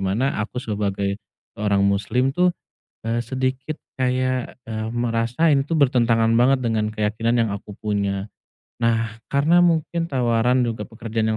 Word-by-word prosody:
mana 105 +5 0
aku 115 +4 -5
sebagai 100 -3 -2 0.4
orang 100 -1 +2
muslim 125 +7 +1
tuh, 180 +3 +3 0.6
eee, 120 +1 0
sedikit 130 +4 -3 0.2
kayak, 130 0 -1
eee, 110 -1 -3
merasa 120 +6 +1
ini 140 -2 +3
itu 165 - -7
bertentangan 115 -6 +3
banget 130 +2 +4
dengan 110 -3 0
keyakinan 110 +3 0
yang 115 - +1
aku 105 +1 -11
punya. 100 -1 -2 0.5
Nah, 115 -1 0
karena 160 +6 +4
mungkin 170 0 +1
tawaran 125 -1 +2
juga 115 -1 -4
pekerjaan 115 -1 -2
115 Hz, 135 wpm, -22 LUFS, 110-130 Hz, 0.6 s, banget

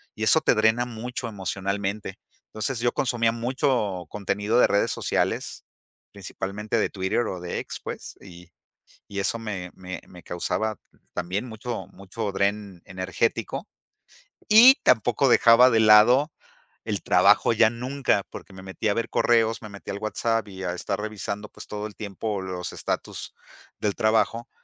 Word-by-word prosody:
y 110 - -4
eso 160 +8 +5
te 130 - +3
drena 110 +3 +3
mucho 120 +1 -5
emocionalmente. 100 0 -3 0.3
Entonces 110 +3 -3
yo 120 0 +1
consumía 115 -3 +1
mucho 120 - -1
contenido 105 +3 0
de - - +7
redes 100 - +1
sociales - - -2 0.5
principalmente 100 +3 -4
de - - +1
Twitter 95 +4 -1
o 90 - -5
de 90 0 -4
ex - - -6
pues, - - -7
y 90 -2 -13 0.6
y 100 - -4
eso 100 +4 0
me 95 -5 -5
me 95 0 -7
me 90 -1 -14
causaba 110 +4 -2 0.4
también 90 +6 -3
mucho 110 -3 -6
mucho 100 +2 -5
dren 100 -2 -2
energético 95 0 -2 0.8
Y 240 +5 +9
tampoco 120 +3 +3
dejaba 120 +1 +7
de 110 -1 +3
lado 115 +8 +6 0.5
el - - -3
trabajo - - +4
ya 110 0 +5
nunca, 125 -3 -1
porque, 100 - -10
me 95 0 -11
metía 95 +3 -2
a - - +2
ver 115 - -2
correos, 115 -1 +2
me 110 - -9
metía 100 -1 -8
al 100 - -5
WhatsApp 115 +1 -1
y 95 -1 -8
a 90 -1 -2
estar 100 +2 -3
revisando 105 -1 -5
pues - - -12
todo 105 0 -5
el 105 - -14
tiempo 100 0 -4
los 90 -2 -5
estatus - - -4 0.4
del 105 -2 -1
trabajo. 115 +2 +1
105 Hz, 155 wpm, -25 LUFS, 95-115 Hz, 0.8 s, Y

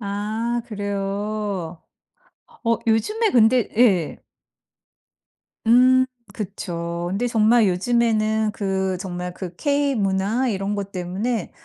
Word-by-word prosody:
아 220 +3 -2
그래요. 200 -4 -3 0.8
어 230 0 +3
요즘에 425 - +2
근데 235 0 +4
예. 195 -9 +2 1.4
음. 255 +2 +6 0.3
그쵸. 175 -4 -4
근데 230 +6 0
정말 225 -1 +4
요즘에는 220 +2 +1
그 190 -3 -1
정말 180 -2 -5
그 180 -2 -7
K-문화 245 -5 0
이런 200 -2 -1
것 200 -1 -4
때문에 190 +4 -3
210 Hz, 180 characters per minute, -22 LUFS, 190-235 Hz, 1.4 s, 음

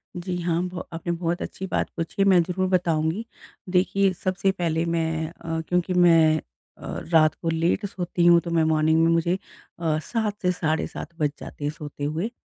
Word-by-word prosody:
जी 180 +1 -4
हाँ, 170 0 0
ब 180 0 -5
आपने 170 +1 -3
बहुत 170 +1 -2
अच्छी 190 - -5
बात - - -1
पूछी 165 0 -4
है - - +5
मैं 180 -2 +6
ज़रूर 185 +2 -1
बताऊँगी। 170 +2 +1 0.4
देखिए 190 +1 +2
सबसे 185 0 +1
पहले 170 -3 -1
मैं 160 -1 -1
अ, 165 -1 -5
क्योंकि 180 +1 0
मैं 165 -3 +5 0.4
अ, - - -15 0.3
रात 155 -1 +6
को 165 - -1
लेट 165 +5 +1
सोती 175 -2 -1
हूँ 170 0 +7
तो 170 - -3
मैं 165 -1 +3
मॉर्निंग 160 +1 +3
में 165 - +4
मुझे 170 +2 +2 0.4
अ, 160 -2 +1
7:00 220 0 -1
से 180 - +2
7:30 160 -3 -2
बज 150 -2 +2
जाते - - -9
हैं 145 - 0
सोते 145 -1 -8
हुए। 160 +9 -1
170 Hz, 190 wpm, -24 LUFS, 160-180 Hz, 0.4 s, हूँ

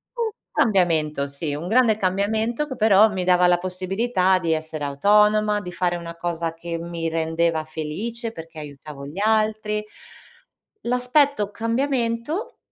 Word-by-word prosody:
un 460 -2 -1 0.2
cambiamento, 165 - +2
sì, 145 +1 -4
un 165 +4 -5
grande 225 -1 +4
cambiamento 220 +8 0
che 260 - -6
però 220 -2 +5
mi 190 -3 -3
dava 180 0 +4
la 175 0 +4
possibilità 185 +1 0
di 165 -2 -1
essere 155 -1 -4
autonoma, 210 +7 +3
di 180 -2 -7
fare 175 0 0
una 170 -1 -7
cosa 170 -1 -2
che 170 0 -5
mi 170 -1 -4
rendeva 165 0 0
felice 205 +10 -5
perché 165 -4 -10
aiutavo 140 -1 -9
gli 150 +7 -7
altri. 215 -1 +1 1.0
L'aspetto 250 -2 +1
cambiamento 235 - -1
185 Hz, 135 wpm, -23 LUFS, 165-220 Hz, 1.0 s, però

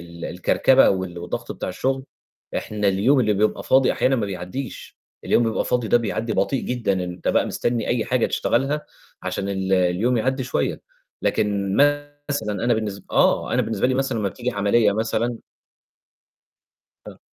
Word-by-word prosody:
ال 85 0 -10
الكركبة 130 +8 +3
وال 95 -2 -3
والضغط 85 +1 -5
بتاع - - -5
الشُغل، 130 +8 -1 0.5
إحنا 105 -1 -1
اليوم 115 +9 +3
اللي 105 -3 +2
بيبقى 105 +2 +1
فاضي، 130 0 +4
أحيانًا 135 0 +2
ما 110 - -1
بيعدّيش، 100 +7 -6 0.3
اليوم - - +3
بيبقى 115 -1 0
فاضي 120 -3 0
ده - - +5
بيعدّي 115 0 -2
بطيء 135 - 0
جدًا، 120 -5 -1
إن 95 - -1
أنت 90 0 -4
بقى - - +2
مستني 120 -2 -1
أي 120 -2 +1
حاجة 125 -2 +1
تشتغلها، 140 +5 0 0.4
عشان 100 - -3
ال 95 -1 -2
اليوم 95 +7 +2
يعدّي 130 +4 0
شوية، 125 - -2 0.4
لكن 100 -2 0 0.5
مثلًا 105 -8 -2
أنا 120 - +3
بالنس 105 -3 -3
آه، - - +2
أنا - - +2
بالنسبة - - 0
لي 130 - +1
مثلًا 130 -3 0
أمّا 100 - 0
بتيجي 125 +5 -4
عملية 105 0 +2
مثلًا 115 +2 -1 1.7
آه. - - -10
110 Hz, 165 wpm, -22 LUFS, 100-125 Hz, 1.7 s, ده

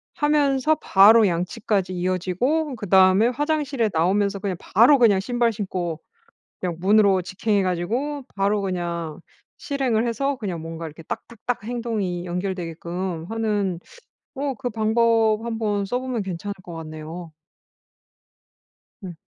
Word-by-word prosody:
하면서 295 -1 +2
바로 215 -1 +6
양치까지 185 +2 -1
이어지고 185 - -1
그다음에 190 +1 +4
화장실에 285 -2 0
나오면서 200 +5 +1
그냥 190 -3 -3
바로 240 +8 +5
그냥 210 -5 +5
신발 240 +2 +1
신고 180 -6 -3 0.6
그냥 180 -2 -3
문으로 195 0 +4
직행해 205 +3 0
가지고 235 +12 -2
바로 200 +1 +1
그냥 170 -4 -3 0.4
실행을 260 -7 0
해서 275 +4 -1
그냥 185 -8 -4
뭔가 165 0 -6
이렇게 160 +1 -10
딱딱딱 235 +6 -5
행동이 215 -7 -3
연결되게끔 175 -1 -4
하는 210 -5 -1 0.6
어 275 0 -2
그 250 -1 -4
방법 225 0 +2
한번 215 -3 -1
써보면 250 0 -2
괜찮을 190 +2 -5
것 175 - -10
같네요. 160 +1 -8 1.7
음. 180 -3 -7
205 Hz, 285 characters per minute, -23 LUFS, 180-235 Hz, 1.7 s, 바로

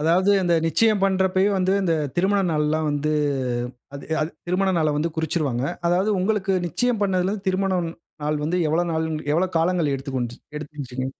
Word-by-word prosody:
அதாவது 175 +6 +3
அந்த 175 -1 +2
நிச்சயம் 210 +5 +2
பண்றப்பவே 190 0 +2
வந்து 185 +1 +2
இந்த 175 -3 +1 0.2
திருமண 195 +3 +2
நாள்ல்லாம் 155 0 +1
வந்து, 145 +1 0 0.8
அது 140 - -7 0.2
அது 155 +2 -1 0.2
திருமண 190 +2 +1
நாள 155 - +2
வந்து 160 +3 0
குறிச்சுறுவாங்க. 150 -6 -1 0.2
அதாவது 185 +5 +2
உங்களுக்கு 195 0 0
நிச்சயம் 240 +7 0
பண்ணதுலருந்து 190 +1 0
திருமணம் 185 -2 +1 0.4
நாள் 150 0 0
வந்து, 170 +4 0
எவ்வளவு 170 +3 +1
நாள் 160 0 0 0.3
எவ்வளவு 180 +3 0
காலங்கள்? 165 -3 +1
எடுத்து 135 0 -5
கொண்டுச் 120 0 -4 0.2
எடுத்துச்சுங்க? 140 -4 -5
175 Hz, 155 wpm, -23 LUFS, 150-190 Hz, 0.8 s, அதாவது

